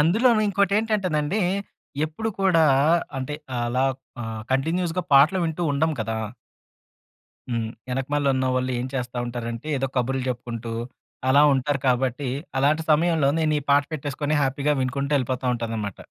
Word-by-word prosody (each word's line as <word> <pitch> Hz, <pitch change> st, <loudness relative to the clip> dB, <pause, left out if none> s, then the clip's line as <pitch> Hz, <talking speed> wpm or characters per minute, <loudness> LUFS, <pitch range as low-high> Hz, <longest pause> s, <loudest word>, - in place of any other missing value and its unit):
అందులోను 215 Hz, +8 st, +4 dB
ఇంకోటేంటంటేనండి 200 Hz, -3 st, +1 dB, 0.6 s
ఎప్పుడు 190 Hz, +9 st, -4 dB
కూడా 175 Hz, -4 st, +4 dB, 0.5 s
అంటే 130 Hz, +3 st, -4 dB, 0.3 s
అలా 125 Hz, +2 st, +1 dB, 0.4 s
ఆహ్, 110 Hz, -1 st, -5 dB
కంటిన్యూస్‌గా 165 Hz, +5 st, 0 dB
పాటలు 155 Hz, +7 st, +6 dB
వింటూ 165 Hz, +2 st, -2 dB
ఉండం 155 Hz, +3 st, +1 dB
కదా! 110 Hz, 0 st, -2 dB, 1.3 s
హ్మ్. 115 Hz, -1 st, -1 dB, 0.2 s
వెనకమాలున్నవాళ్ళు 130 Hz, -1 st, 0 dB
ఏం 125 Hz, -, -2 dB
చేస్తా 125 Hz, -2 st, -3 dB
ఉంటారంటే 120 Hz, +2 st, -5 dB
ఏదో 135 Hz, 0 st, -1 dB
కబుర్లు 130 Hz, +1 st, 0 dB
చెప్పుకుంటూ, 120 Hz, -2 st, -5 dB, 0.6 s
అలా 140 Hz, +2 st, +6 dB
ఉంటారు 135 Hz, +1 st, 0 dB
కాబట్టి. 130 Hz, +1 st, 0 dB, 0.3 s
అలాంటి 150 Hz, +4 st, +2 dB
సమయంలో 155 Hz, -2 st, +3 dB
నేను 155 Hz, -1 st, +2 dB
ఈ -, -, -9 dB
పాట 145 Hz, 0 st, +5 dB
పెట్టేసుకొని 145 Hz, +1 st, -2 dB
హ్యాపీగా 140 Hz, +2 st, +1 dB
వినుకుంటూ 140 Hz, +2 st, -2 dB
వెళ్ళిపోతా 130 Hz, -1 st, -1 dB
ఉంటాననమాట. 115 Hz, -4 st, -4 dB
140 Hz, 125 wpm, -24 LUFS, 125-160 Hz, 1.3 s, పాటలు